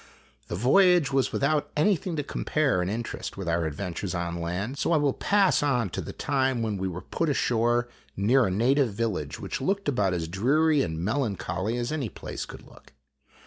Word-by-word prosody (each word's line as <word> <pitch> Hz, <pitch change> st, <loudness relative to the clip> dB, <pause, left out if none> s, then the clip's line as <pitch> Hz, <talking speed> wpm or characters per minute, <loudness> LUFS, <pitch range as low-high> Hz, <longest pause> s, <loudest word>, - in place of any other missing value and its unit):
The -, -, -4 dB
voyage 160 Hz, -, +4 dB
was 135 Hz, -1 st, +2 dB
without 145 Hz, +2 st, +1 dB
anything 180 Hz, +1 st, +1 dB
to 145 Hz, -, -1 dB
compare 140 Hz, -7 st, 0 dB
in 90 Hz, -, -1 dB
interest 115 Hz, 0 st, -4 dB
with 95 Hz, -3 st, -5 dB
our 85 Hz, -1 st, +1 dB
adventures 90 Hz, +3 st, -4 dB
on 85 Hz, 0 st, -3 dB
land, 100 Hz, +11 st, -3 dB
so -, -, +1 dB
I -, -, +5 dB
will 145 Hz, -3 st, +2 dB
pass 200 Hz, -2 st, +3 dB
on 125 Hz, -9 st, +1 dB
to -, -, -3 dB
the -, -, -6 dB
time 130 Hz, -3 st, 0 dB
when 105 Hz, -3 st, -2 dB
we 95 Hz, -, -1 dB
were 90 Hz, 0 st, -5 dB
put 165 Hz, -, -1 dB
ashore 120 Hz, -2 st, +1 dB, 0.3 s
near 120 Hz, +5 st, +3 dB
a -, -, 0 dB
native 120 Hz, +6 st, +2 dB
village 105 Hz, -10 st, -2 dB
which -, -, -4 dB
looked 195 Hz, +7 st, -1 dB
about 100 Hz, -9 st, +1 dB
as 80 Hz, -2 st, -3 dB
dreary 140 Hz, -, +2 dB
and 80 Hz, -3 st, -2 dB
melancholy 110 Hz, -2 st, -1 dB
as 120 Hz, +2 st, -2 dB
any 145 Hz, -7 st, -2 dB
place -, -, -7 dB
could -, -, -11 dB
look. -, -, -18 dB
120 Hz, 190 wpm, -27 LUFS, 95-145 Hz, 0.3 s, I